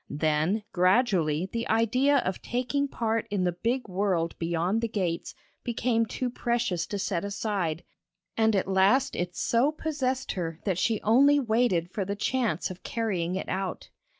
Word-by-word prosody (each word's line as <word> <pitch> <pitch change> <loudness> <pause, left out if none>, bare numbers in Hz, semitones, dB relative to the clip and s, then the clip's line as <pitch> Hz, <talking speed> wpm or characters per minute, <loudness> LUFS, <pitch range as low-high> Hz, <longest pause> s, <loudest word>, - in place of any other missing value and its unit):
Then 155 +7 0
gradually 180 - +2
the 230 0 -2
idea 250 +6 +3
of 185 -1 -2
taking 255 +4 -1
part 225 -3 -1
in 200 -2 0
the 180 - +2
big 230 +9 -2
world 185 -3 0
beyond 170 +6 0
the 230 - 0
gates 185 -6 -3 0.3
became 230 -1 0
too 250 +3 -3
precious 235 -8 -1
to 205 - -3
set 190 -2 -1
aside, 200 -5 -2 0.5
and 220 -1 +3
at 190 - 0
last 195 +8 +3
it 175 0 -3
so 240 +5 +2
possessed 270 -4 -2
her, 165 -4 -4
that 185 -4 0
she 225 +1 0
only 280 +6 +5
waited 220 -8 +1
for 200 - -2
the 200 +2 -3
chance 235 -1 -1
of 180 - -10
carrying 185 -6 -2
it 190 - -4
out. 190 0 -3
205 Hz, 160 wpm, -27 LUFS, 180-240 Hz, 0.5 s, only